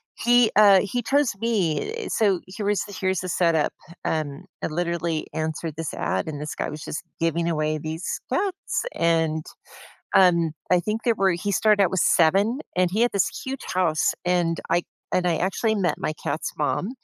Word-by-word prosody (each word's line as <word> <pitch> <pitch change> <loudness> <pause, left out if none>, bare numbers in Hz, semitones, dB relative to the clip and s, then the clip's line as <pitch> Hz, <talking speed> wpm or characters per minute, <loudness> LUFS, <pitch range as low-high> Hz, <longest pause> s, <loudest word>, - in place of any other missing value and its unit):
he, 240 -1 +4
uh 200 -2 +7
he 225 +5 -2
chose 280 +2 +2
me, 215 - 0
eh, 455 - -5
so 200 -5 +2
here 200 +2 -5
was 205 -1 +1
here's 190 -2 -1
the 185 - -5
setup. 165 -3 +2 0.3
Um, 150 -3 -2 0.2
I - - +1
literally 170 -1 -2
answered 160 0 -3
this 165 -2 -3
ad, - - -1
and 150 -2 -5
this 150 +1 -5
guy - - -3
was 150 0 -7
just 155 - -5 0.2
giving 165 +1 0
away 155 -1 0
these 160 +3 -4
cats, 395 -1 -1
and, 160 -2 +1 0.7
um, 170 -4 +5 0.2
I 180 - +5
think 215 +4 -3
there 235 - +3
were 195 -1 +3
he 175 +4 -2
started 210 0 +4
out 185 - +3
with 190 - 0
7, 195 - +3 0.2
and 180 0 +3
he 210 +5 -1
had 240 - +3
this 200 -3 +2 0.2
huge 265 0 -5
house, 170 -4 +2
and 175 -2 +1
I 175 - +3 0.3
and 180 -1 +1
I 170 -2 +2
actually 205 +4 0
met 190 -4 +1
my - - -2
cat's 160 - -3
mom, 195 - 0
180 Hz, 185 wpm, -24 LUFS, 160-205 Hz, 0.7 s, uh